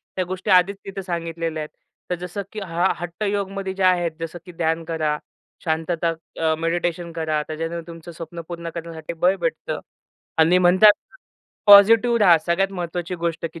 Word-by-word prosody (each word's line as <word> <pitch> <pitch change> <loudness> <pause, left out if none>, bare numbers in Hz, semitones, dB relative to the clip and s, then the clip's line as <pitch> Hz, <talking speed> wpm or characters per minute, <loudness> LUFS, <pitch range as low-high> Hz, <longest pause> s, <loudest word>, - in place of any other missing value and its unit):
त्या 185 - 0
गोष्टी 185 +1 -5
आधीच 185 +2 +5
तिथं 195 0 -5
सांगितलेल्या 165 -3 -3
आहेत. 150 - -8 0.4
तर 180 - 0
जसं 180 +3 -5
की 215 - -6
हा 175 +1 +1
हट्टयोगमध्ये 195 +2 -3
जे 195 - -2
आहेत 175 -2 +3
जसं 165 +1 -5
की 180 - -10
ध्यान 165 -1 -1
करा. 155 -2 -1 0.5
शांतता, 165 +1 0 0.3
अ, 160 -1 +2
मेडिटेशन 170 +1 -1
करा 160 -2 -1
त्याच्याने 165 +2 -4
तुमचं 165 0 -10
स्वप्न 170 +1 -8
पूर्ण 170 -1 -6
करण्यासाठी 165 -1 -6
बळ 180 +3 +2
भेटतं. 165 -1 -2 0.6
आणि 165 +3 +5
म्हणतात 185 +4 +7 0.5
ना - - -
पॉझिटिव्ह 230 +4 +7
रहा. 175 -5 +7
सगळ्यात 185 +4 0
महत्वाची 175 0 -4
गोष्ट 170 -1 -2
की 165 - -10
170 Hz, 165 wpm, -22 LUFS, 165-185 Hz, 0.6 s, म्हणतात